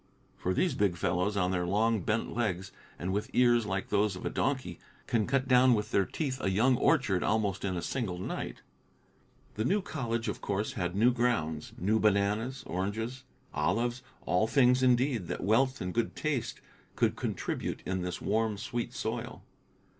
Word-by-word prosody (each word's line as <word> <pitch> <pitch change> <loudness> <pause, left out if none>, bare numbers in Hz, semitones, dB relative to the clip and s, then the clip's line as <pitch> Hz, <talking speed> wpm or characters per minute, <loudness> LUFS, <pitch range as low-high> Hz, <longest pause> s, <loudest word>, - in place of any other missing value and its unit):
For 90 +1 -2
these 180 - +2
big 100 -4 +1
fellows, 90 +5 0
on 90 -2 +1
their 90 -2 0
long, 110 +4 +2
bent 105 +6 -1
legs, 100 -5 -1 0.3
and 95 +2 -3
with 105 +3 -2
ears 120 -3 +4
like 95 -1 -2
those 105 -1 +2
of 90 - -8
a - - -1
donkey, 130 -11 -1 0.3
can 110 -3 +1
cut 135 -1 +1
down 125 -1 +6
with 105 0 -3
their 100 - +2
teeth 135 -4 -3
a - - +1
young 115 +7 +3
orchard 115 - +2
almost 105 -3 0
in 95 -2 -1
a 85 - -3
single 110 -9 -2
night. 90 - -5 0.9
The 110 - -2
new 195 - +2
college, 120 - -3
of - - -3
course, 100 +1 -2
had 90 -1 -2
new 115 +5 +5
grounds, 85 -11 -1
new 105 +5 +1
bananas, 105 +5 +1
oranges, 110 +8 -3 0.3
olives, 115 +11 0 0.2
all 105 +5 +2
things, 125 +1 +4
indeed, 125 -5 +2
that - - -4
wealth 130 +7 +2
and 90 0 -3
good 115 0 -1
taste 145 -6 -2 0.3
could - - +2
contribute - - -3
in 95 0 -1
this 90 -1 -3
warm, 110 0 0
sweet 120 +3 -4
soil. - - -4
110 Hz, 175 wpm, -30 LUFS, 95-125 Hz, 0.9 s, down